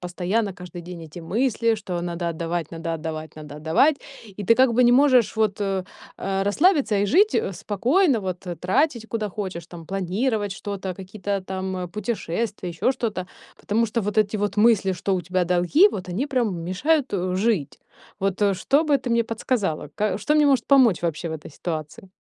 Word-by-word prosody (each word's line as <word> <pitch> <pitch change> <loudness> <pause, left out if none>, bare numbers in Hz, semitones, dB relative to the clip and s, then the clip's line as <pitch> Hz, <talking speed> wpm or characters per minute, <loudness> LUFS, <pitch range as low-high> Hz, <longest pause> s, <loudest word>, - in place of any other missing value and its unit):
постоянно, 185 +4 -1
каждый 180 -1 -9
день 175 0 -9
эти 160 +3 -11
мысли, 230 +5 +1
что: 180 -5 -4
надо 170 0 -3
отдавать, 165 0 -3
надо 165 0 -4
отдавать, 155 -1 -6
надо 150 -1 -9
отдавать,- 165 - +3 0.3
и 205 -1 -9
ты 230 - +5
как 255 0 +4
бы 250 +2 +4
не 240 - +6
можешь 255 -4 +4
вот, 215 -2 +1
э, 195 -2 -1 0.3
а, 195 0 -2
расслабиться 285 - +3
и 200 - +2
жить, 400 - +4
э, 195 - 0
спокойно, 245 - +1
вот, 185 -1 -5
э, 175 -1 -4
тратить, 225 - 0
куда 220 -2 -2
хочешь 185 -4 -5
там, 170 -2 -11
планировать 200 +3 -1
что-то, 195 -2 -5
какие-то 195 +1 -4
там 185 -1 -4
путешествия, 210 -2 -3
ещё 170 +9 0
что-то, 205 -8 -3 0.3
потому 220 +3 +1
что 230 +2 -1
вот 210 +1 -3
эти 215 0 +2
вот 205 0 -1
мысли, 210 -3 +4
что 190 +1 -1
у 185 - 0
тебя 180 +1 0
долги, 180 - +4
вот 185 - -6
они 200 +11 -2
прям 245 -9 0
мешают, 275 - +1
э, 185 -2 -1
жить. 195 -7 0 0.4
Вот, 195 0 -1
э, 200 -1 +3
что 280 - +2
бы 295 -2 +3
ты 250 -2 -5
мне 235 0 +2
подсказала? 215 - -2
Ка 210 -1 0
что 300 - 0
мне 300 -1 +5
может 270 -4 +2
помочь 255 -10 +5
вообще 170 0 -2
в 160 - -4
этой 155 0 -8
ситуации? 155 +3 -6
195 Hz, 190 wpm, -23 LUFS, 180-230 Hz, 0.4 s, не